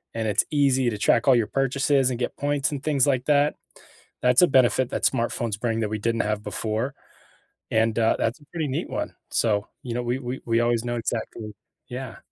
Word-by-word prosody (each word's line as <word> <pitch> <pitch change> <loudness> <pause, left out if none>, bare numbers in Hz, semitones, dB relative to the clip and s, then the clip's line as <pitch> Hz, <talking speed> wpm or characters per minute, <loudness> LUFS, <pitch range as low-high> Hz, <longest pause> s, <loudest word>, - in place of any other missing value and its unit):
and 110 -1 -1
it's 105 - +3
easy 135 -4 +2
to 105 - -4
track 115 +4 +2
all 130 - +7
your 115 -3 +2
purchases 135 0 +1
and 125 - -2
get 120 - -3
points 145 0 0
and 140 -1 -5
things 145 -4 +2
like 130 -3 +1
that. 145 0 +3 0.7
That's 125 0 +4
a 180 - +7
benefit 130 -2 +3
that - - -3
smartphones 115 -4 0
bring 115 -2 -1
that 105 - -1
we 110 -1 -3
didn't 115 +2 0
have 105 0 -1
before, 115 +6 -3 0.8
and, 110 0 +2
uh, 110 - +3
that's 115 +6 -1
a 145 - -18
pretty 160 -4 -2
neat 135 - -3
one. - - -4 0.2
So, 105 -3 +1 0.2
you 120 -2 -4
know, 120 0 -2
we 120 +2 -1
we 125 0 -5
we 115 0 +2
always 120 -1 +1
know 120 0 -2
exactly 110 -2 -4 0.4
Yeah. 125 -1 -6
120 Hz, 210 wpm, -24 LUFS, 115-135 Hz, 0.8 s, all